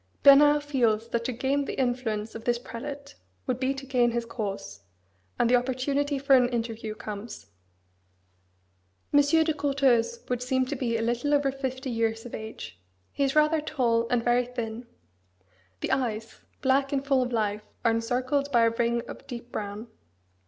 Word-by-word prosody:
Bernard 290 Hz, +1 st, +7 dB
feels 235 Hz, -6 st, +1 dB
that 235 Hz, 0 st, -1 dB
to 255 Hz, -, -1 dB
gain 275 Hz, +4 st, 0 dB
the -, -, -5 dB
influence 235 Hz, -4 st, -1 dB
of 225 Hz, -, -8 dB
this 240 Hz, 0 st, +1 dB
prelate 280 Hz, +4 st, -8 dB, 0.3 s
would 255 Hz, -2 st, -1 dB
be 260 Hz, 0 st, +1 dB
to 270 Hz, 0 st, -7 dB
gain 250 Hz, -3 st, +2 dB
his 235 Hz, 0 st, -2 dB
cause; 200 Hz, -, -5 dB, 0.6 s
and -, -, +3 dB
the 245 Hz, -, +5 dB
opportunity 275 Hz, +3 st, 0 dB
for 275 Hz, 0 st, +4 dB
an 250 Hz, -1 st, +4 dB
interview 225 Hz, -2 st, -3 dB
comes. 210 Hz, -, -8 dB, 1.6 s
Monseigneur 290 Hz, +3 st, +5 dB
de 315 Hz, 0 st, 0 dB
Courteheuse 280 Hz, -, +1 dB
would 250 Hz, -1 st, -2 dB
seem 260 Hz, +1 st, +1 dB
to 285 Hz, +3 st, -3 dB
be 235 Hz, -3 st, -1 dB
little 240 Hz, +6 st, +1 dB
over 285 Hz, -1 st, +2 dB
fifty 260 Hz, -1 st, -4 dB
years 225 Hz, 0 st, -1 dB
of 240 Hz, -, -9 dB
age: 220 Hz, -, -7 dB, 0.3 s
he 280 Hz, -, -1 dB
is 270 Hz, +1 st, 0 dB
rather 305 Hz, +1 st, +4 dB
tall, 235 Hz, -6 st, +1 dB
and 245 Hz, -2 st, +1 dB
very 240 Hz, 0 st, +2 dB
thin: 235 Hz, -1 st, -5 dB, 0.9 s
the -, -, -2 dB
eyes, 230 Hz, -4 st, -2 dB, 0.2 s
black 270 Hz, +1 st, +2 dB
and 275 Hz, -1 st, -1 dB
full 270 Hz, -2 st, +3 dB
of 250 Hz, 0 st, -2 dB
life, 210 Hz, -2 st, 0 dB, 0.2 s
are 230 Hz, -, +5 dB
encircled 255 Hz, +5 st, 0 dB
by 235 Hz, -3 st, +4 dB
a 230 Hz, -, +4 dB
ring 235 Hz, 0 st, 0 dB
of 275 Hz, -, -10 dB
deep 245 Hz, -2 st, -8 dB
brown. 205 Hz, +1 st, -5 dB
250 Hz, 170 wpm, -27 LUFS, 230-275 Hz, 1.6 s, Bernard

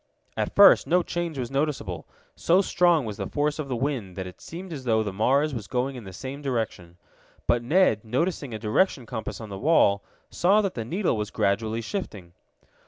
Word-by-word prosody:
At -, -, -2 dB
first 200 Hz, -, +7 dB
no 180 Hz, +1 st, +3 dB
change 170 Hz, -4 st, -3 dB
was 125 Hz, -1 st, -4 dB
noticeable. 145 Hz, +1 st, -2 dB, 0.3 s
So 185 Hz, +4 st, +3 dB
strong 175 Hz, -6 st, +3 dB
was 105 Hz, -2 st, -5 dB
the -, -, -4 dB
force 150 Hz, +1 st, -1 dB
of 150 Hz, -, -3 dB
the 130 Hz, -, -2 dB
wind 120 Hz, -8 st, -3 dB
that 95 Hz, -, -4 dB
it 90 Hz, -, -11 dB
seemed 175 Hz, +1 st, -8 dB
as 135 Hz, -4 st, -7 dB
though 110 Hz, -3 st, +2 dB
the 100 Hz, -2 st, -4 dB
Mars 140 Hz, +9 st, +2 dB
was 110 Hz, -5 st, -5 dB
going 130 Hz, +1 st, -1 dB
in 120 Hz, -4 st, -9 dB
the 95 Hz, -, -8 dB
same 130 Hz, +9 st, -7 dB
direction. 110 Hz, -10 st, -3 dB, 0.5 s
But 120 Hz, -, +2 dB
Ned, 125 Hz, -, +3 dB
noticing 140 Hz, +4 st, -1 dB
a 110 Hz, -, -4 dB
direction 120 Hz, -, +1 dB
compass 110 Hz, -2 st, -5 dB
on 110 Hz, -2 st, -8 dB
the 95 Hz, -1 st, -6 dB
wall, 100 Hz, -9 st, +4 dB, 0.3 s
saw 195 Hz, +4 st, +3 dB
that 195 Hz, -3 st, -2 dB
the 115 Hz, -, -4 dB
needle 180 Hz, -, 0 dB
was 105 Hz, -1 st, -3 dB
gradually 110 Hz, +2 st, 0 dB
shifting. 105 Hz, -, -6 dB
130 Hz, 200 wpm, -26 LUFS, 110-160 Hz, 0.5 s, first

